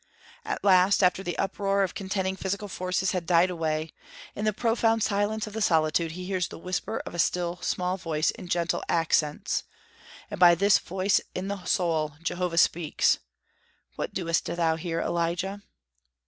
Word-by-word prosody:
At 430 -1 -4
last, 190 0 +5
after 180 +1 +3
the 175 -2 -4
uproar 195 0 0
of 190 - -2
contending 190 -1 -2
physical 200 +2 -3
forces 185 0 -1
had 180 -3 -3
died 175 +1 +4
away, 160 -2 -2 0.4
in 210 - -3
the 215 - +3
profound 225 0 +1
silence 210 +1 0
of 210 - -9
the 220 - -3
solitude 160 -2 +2
he 180 +1 -7
hears 185 -2 -1
the - - -10
whisper 180 +2 -3
of - - -7
a 175 - -6
still 175 +1 0
small 180 +1 -1
voice 160 -3 0
in 180 - -10
gentle 170 -1 0
accents; 155 -2 +1 0.7
and - - -5
by 175 -1 +8
this 200 +3 +4
voice 190 +2 +1
in 190 +2 -3
the 200 -2 -4
soul 160 -4 0
Jehovah 175 0 -2
speaks: 165 -2 +3 0.8
"What - - -4
doest 165 -2 -1
thou 165 -2 0
here, 165 0 -3
Elijah?" 175 +4 -2
180 Hz, 165 wpm, -27 LUFS, 170-195 Hz, 0.8 s, by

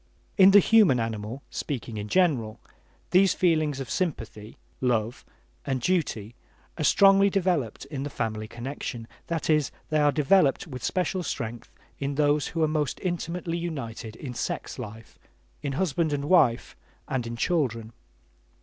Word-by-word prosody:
In 190 -1 +8
the 200 - +8
human 200 - +5
animal, 115 +3 -4
speaking 120 -5 -4
in 105 0 -4
general, 130 - +1 0.5
these 190 +2 +5
feelings 155 -5 +1
of 135 - -5
sympathy 115 - -4 0.2
(love) 120 -2 0 0.4
and 130 - -1
duty 120 - -1 0.5
are - - 0
strongly 195 +8 +6
developed 175 - -1
in 140 -1 -6
the 145 - -3
family 110 -4 -3
connection; 120 -1 -6 0.2
that 165 -3 -2
is, 150 -3 +2 0.2
they 155 - +3
are 145 -1 +4
developed 150 0 +3
with 130 -7 -8
special 185 0 -1
strength 115 -7 -5 0.3
in 140 0 -2
those 145 0 +2
who 165 -1 -1
are - - +4
most 155 -2 -1
intimately 175 -1 -3
united 115 -10 -5
in 125 +1 -7
sex 125 - -4
life, 110 -1 -9 0.4
in 140 - -3
husband 160 -1 0
and 140 0 -2
wife 145 -8 +3 0.3
and 125 -3 -2
in 115 - -5
children. 115 -6 -1
140 Hz, 150 wpm, -26 LUFS, 115-170 Hz, 0.5 s, In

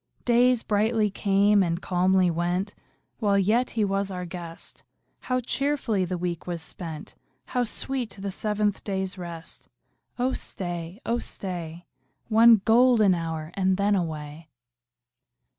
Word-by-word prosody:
Days 245 0 +4
brightly 215 0 +1
came 200 +1 +3
and 170 -2 0
calmly 185 0 +2
went, 175 +4 -1 0.5
While 205 -4 +2
yet 220 +6 +2
he 215 - +3
was 195 0 -1
our 180 -1 -5
guest; 170 -1 -8 0.4
How 255 0 -1
cheerfully 255 -6 0
the 180 0 -3
week 175 -1 -4
was 170 -2 -4
spent! 160 -3 -7 0.3
How 250 - 0
sweet 250 +1 -3
the 195 0 -4
seventh 210 +1 -1
day's 190 -1 -3
rest! 170 -2 -7 0.5
Oh 255 +1 0
stay, 175 +1 -3
oh 235 +1 0
stay. 175 -5 -5 0.4
One 225 -2 +6
golden 230 -3 +5
hour, 165 -2 -4
and 190 -1 +1
then 200 +1 +2
away. 155 -2 -4
195 Hz, 130 wpm, -26 LUFS, 175-220 Hz, 0.5 s, One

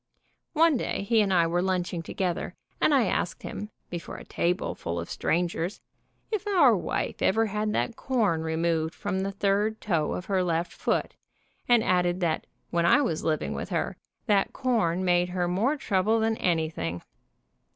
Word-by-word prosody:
One 325 -2 +4
day 215 - -2
he 220 +2 +3
and 200 -2 +1
I 175 -3 +4
were 175 +2 +1
lunching 180 -2 -1
together, 175 +1 -3 0.3
and - - +4
I 270 -5 +4
asked 175 - -2
him, 210 - -6 0.2
before 175 -1 -6
a - - -9
table 175 +2 -1
full 85 +1 -4
of 85 - -6
strangers, 175 +2 -1 0.5
if 420 -1 -2
our 330 - +5
wife 175 -4 -3
ever 225 +4 +3
had 210 0 -1
that 235 - -1
corn 215 -13 0
removed 160 0 0
from 200 -2 -2
the 195 +1 -1
third 205 +2 0
toe 165 -7 0
of 180 - -4
her 190 -2 +1
left 170 0 -1
foot, - - -1 0.6
and 240 -2 +5
added 180 0 +2
that 170 -2 0 0.2
when 170 0 +2
I 290 +10 +5
was 165 - -1
living 155 -1 0
with - - -5
her - - -1 0.3
that 205 -4 +2
corn 190 -8 +1
made 175 0 +3
her 180 -1 -1
more 220 +12 +1
trouble 215 -1 +1
than 225 0 +1
anything. 155 - -1
185 Hz, 170 wpm, -27 LUFS, 170-220 Hz, 0.6 s, our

